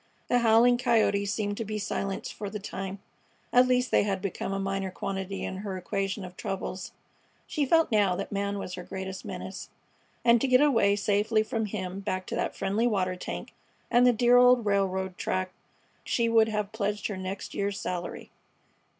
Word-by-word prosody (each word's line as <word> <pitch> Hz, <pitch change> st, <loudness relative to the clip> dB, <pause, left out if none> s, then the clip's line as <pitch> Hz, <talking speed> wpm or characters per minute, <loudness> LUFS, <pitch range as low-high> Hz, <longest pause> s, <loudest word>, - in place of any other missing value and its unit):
The 245 Hz, -, +4 dB
howling 235 Hz, +1 st, +5 dB
coyotes 220 Hz, -5 st, +2 dB
seemed 205 Hz, -1 st, -2 dB
to 230 Hz, -, -2 dB
be 215 Hz, 0 st, -4 dB
silenced 200 Hz, -1 st, -3 dB
for 205 Hz, -, -5 dB
the 210 Hz, -, -5 dB
time; 195 Hz, -1 st, -5 dB, 0.6 s
at 250 Hz, +1 st, +6 dB
least 250 Hz, 0 st, +2 dB
they -, -, +5 dB
had 200 Hz, -2 st, -1 dB
become 195 Hz, 0 st, -4 dB
a 195 Hz, -, -1 dB
minor 195 Hz, 0 st, -2 dB
quantity 190 Hz, +1 st, -4 dB
in 190 Hz, -, -4 dB
her 195 Hz, -1 st, -4 dB
equation 195 Hz, +1 st, -3 dB
of 180 Hz, 0 st, -10 dB
troubles. 190 Hz, 0 st, -4 dB, 0.5 s
She 290 Hz, -3 st, -1 dB
felt 325 Hz, 0 st, +4 dB
now 205 Hz, -4 st, +3 dB
that 195 Hz, -, -5 dB
man 200 Hz, 0 st, -1 dB
was 185 Hz, -2 st, -5 dB
her 180 Hz, -, -5 dB
greatest 190 Hz, 0 st, -6 dB
menace, -, -, -6 dB, 0.6 s
and 235 Hz, -1 st, +6 dB
to -, -, +2 dB
get 255 Hz, 0 st, +5 dB
away 230 Hz, -9 st, +4 dB
safely 210 Hz, +2 st, +2 dB
from 220 Hz, -1 st, -2 dB
him 190 Hz, -2 st, -4 dB
back 185 Hz, -2 st, -3 dB
to -, -, -4 dB
that -, -, -2 dB
friendly 205 Hz, +5 st, 0 dB
water 185 Hz, -5 st, 0 dB
tank 180 Hz, -, -6 dB, 0.4 s
and 245 Hz, +1 st, +6 dB
the -, -, +7 dB
dear 240 Hz, +1 st, +4 dB
old 250 Hz, -2 st, +6 dB
railroad 190 Hz, -2 st, 0 dB
track 185 Hz, 0 st, -1 dB, 0.5 s
she 235 Hz, -1 st, +1 dB
would 225 Hz, -1 st, +5 dB
have 210 Hz, -1 st, -2 dB
pledged 210 Hz, -1 st, -2 dB
her 205 Hz, -, -2 dB
next 190 Hz, +1 st, -5 dB
year's 200 Hz, 0 st, -2 dB
salary. 175 Hz, -1 st, -5 dB
200 Hz, 185 wpm, -28 LUFS, 190-225 Hz, 0.6 s, the